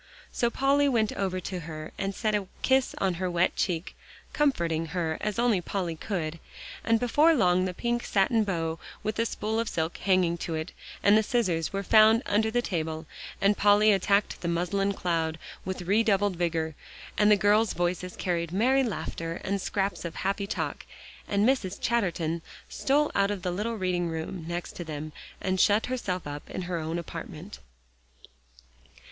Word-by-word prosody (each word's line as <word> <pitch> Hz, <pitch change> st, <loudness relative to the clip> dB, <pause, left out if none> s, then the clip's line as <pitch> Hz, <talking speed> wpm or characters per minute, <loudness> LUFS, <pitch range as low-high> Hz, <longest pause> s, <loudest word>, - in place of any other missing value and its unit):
So 235 Hz, -, +1 dB
Polly 280 Hz, +3 st, +3 dB
went 225 Hz, -5 st, +1 dB
over 185 Hz, -2 st, -1 dB
to 180 Hz, +1 st, -4 dB
her 155 Hz, -1 st, -7 dB
and 195 Hz, 0 st, -3 dB
set 215 Hz, -2 st, 0 dB
a 205 Hz, -2 st, 0 dB, 0.2 s
kiss 265 Hz, 0 st, +2 dB
on 190 Hz, -2 st, +1 dB
her 185 Hz, -, 0 dB
wet 175 Hz, +1 st, +1 dB
cheek, 175 Hz, -2 st, -2 dB, 0.4 s
comforting 170 Hz, -, +1 dB
her 160 Hz, -1 st, -2 dB
as 210 Hz, 0 st, -2 dB
only 235 Hz, -6 st, +2 dB
Polly 175 Hz, -2 st, -3 dB
could, 165 Hz, -3 st, -3 dB, 0.4 s
and 225 Hz, 0 st, +3 dB
before 295 Hz, +7 st, +4 dB
long 185 Hz, -6 st, +3 dB
the 185 Hz, -, -2 dB
pink 240 Hz, +2 st, -1 dB
satin 215 Hz, +3 st, +2 dB
bow, 165 Hz, -5 st, -2 dB, 0.2 s
with 215 Hz, 0 st, -2 dB
the 230 Hz, +1 st, +1 dB
spool 220 Hz, +1 st, -2 dB
of 230 Hz, -, -1 dB
silk 160 Hz, +1 st, -2 dB
hanging 185 Hz, -3 st, +2 dB
to 165 Hz, -, -3 dB
it, 160 Hz, +2 st, -4 dB, 0.3 s
and 205 Hz, -, +6 dB
the 220 Hz, -, +6 dB
scissors 195 Hz, -9 st, 0 dB
were 195 Hz, 0 st, -2 dB
found 220 Hz, +4 st, +6 dB
under 215 Hz, +2 st, +2 dB
the 240 Hz, +2 st, 0 dB
table, 160 Hz, -4 st, -3 dB, 0.3 s
and 200 Hz, +1 st, +3 dB
Polly 210 Hz, +1 st, +6 dB
attacked 200 Hz, +1 st, +1 dB
the 175 Hz, -, -3 dB
muslin 180 Hz, +4 st, 0 dB
cloud 165 Hz, -3 st, -1 dB, 0.3 s
with 185 Hz, -1 st, -4 dB
redoubled 205 Hz, 0 st, +2 dB
vigor, 165 Hz, -2 st, -1 dB, 0.4 s
and 210 Hz, 0 st, +4 dB
the 210 Hz, -, +6 dB
girls' 210 Hz, +2 st, +3 dB
voices 175 Hz, +1 st, -2 dB
carried 170 Hz, -2 st, -2 dB
merry 250 Hz, +8 st, +3 dB
laughter 165 Hz, -7 st, -4 dB
and 200 Hz, 0 st, -1 dB
scraps 195 Hz, +1 st, -1 dB
of 170 Hz, -1 st, -5 dB
happy 200 Hz, +1 st, -1 dB
talk, -, -, -3 dB, 0.4 s
and 205 Hz, +2 st, +2 dB
Mrs. 205 Hz, -8 st, 0 dB
Chatterton 175 Hz, -8 st, 0 dB, 0.3 s
stole 290 Hz, +2 st, +1 dB
out 200 Hz, 0 st, +2 dB
of 205 Hz, -3 st, -3 dB
the 180 Hz, -, -1 dB
little 210 Hz, +6 st, -2 dB
reading 180 Hz, -2 st, 0 dB
room 160 Hz, +1 st, -5 dB
next 170 Hz, +1 st, -4 dB
to 175 Hz, -, -4 dB
them 155 Hz, -1 st, -6 dB, 0.3 s
and 185 Hz, 0 st, -1 dB
shut 210 Hz, +4 st, +4 dB
herself 200 Hz, -8 st, -3 dB
up 145 Hz, 0 st, -7 dB
in 185 Hz, -, -4 dB
her 175 Hz, -1 st, -2 dB
own 160 Hz, +1 st, -3 dB
apartment. 165 Hz, -, -7 dB
190 Hz, 175 wpm, -28 LUFS, 170-215 Hz, 0.4 s, and